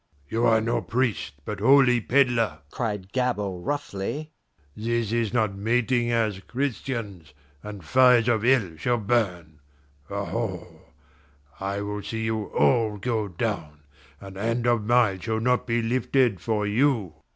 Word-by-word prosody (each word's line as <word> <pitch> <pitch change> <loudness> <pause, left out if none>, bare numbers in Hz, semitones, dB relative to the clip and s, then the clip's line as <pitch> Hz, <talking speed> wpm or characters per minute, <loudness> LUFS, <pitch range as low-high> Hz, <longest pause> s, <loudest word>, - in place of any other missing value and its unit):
"You 115 +2 +1
are 110 -1 +4
no 115 +1 0
priest, 125 - -1
but 105 -2 -5
holy 125 +1 +5
peddler!" 120 - +2
cried 105 -5 -4
Gabord 105 -8 -1
roughly. 145 +2 -3 0.4
"This 115 0 -1
is 115 -2 0
not 110 -5 0
mating 120 +3 +1
as 110 -4 0
Christians, 110 - -4 0.3
and 105 -3 -9
fires 125 +3 +5
of 115 -3 +2
hell 120 -6 +3
shall 120 +9 0
burn 90 -9 -1 0.5
aho! 100 -1 -4 0.7
I 100 +1 -3
will 105 0 -4
see 110 +2 -4
you 110 -1 -1
all 110 -3 +2
go 110 0 -1
down, 85 -6 -4 0.4
and 95 -1 -10
hand 115 +3 -1
of 120 -3 +2
mine 115 -4 +3
shall 110 +3 -2
not 125 +3 +1
be 115 0 0
lifted 120 -2 +1
for 105 +2 -1
you!" 110 - +1
110 Hz, 140 wpm, -25 LUFS, 100-120 Hz, 0.7 s, holy